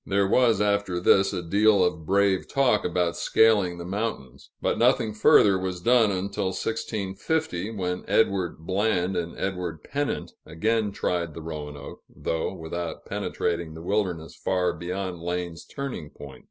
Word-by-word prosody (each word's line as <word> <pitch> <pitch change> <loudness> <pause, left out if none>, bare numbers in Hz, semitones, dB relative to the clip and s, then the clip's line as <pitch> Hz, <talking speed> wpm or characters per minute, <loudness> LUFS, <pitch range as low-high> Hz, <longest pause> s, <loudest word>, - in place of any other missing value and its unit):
There 100 0 +1
was, 115 0 +4
after 100 -3 +1
this, 95 +2 +4
a 90 -3 -3
deal 100 +2 +4
of 80 -3 -1
brave 100 -1 +2
talk 125 -6 +2
about 85 -1 0
scaling 105 -6 +3
the 85 - -7
mountains; 95 - -4
but - - 0
nothing 110 -1 +3
further 100 -2 +5
was 95 -1 -3
done 115 +3 +4
until 95 0 -2
1650, 100 - -2
when 90 -4 -3
Edward 100 -4 +1
Bland 95 -1 0
and 85 0 -3
Edward 90 -4 -3
Pennant 145 0 -3
again 110 +5 0
tried 85 -5 -2
the 80 - -7
Roanoke, 75 -3 -7
though 80 -1 -3
without 85 -1 -6
penetrating 85 -2 -2
the 80 - -9
wilderness 90 -4 -2
far 90 -1 0
beyond 90 0 -4
Lane's 85 -1 -4
turning 135 - -6
point. - - -11
95 Hz, 145 wpm, -26 LUFS, 85-105 Hz, -, further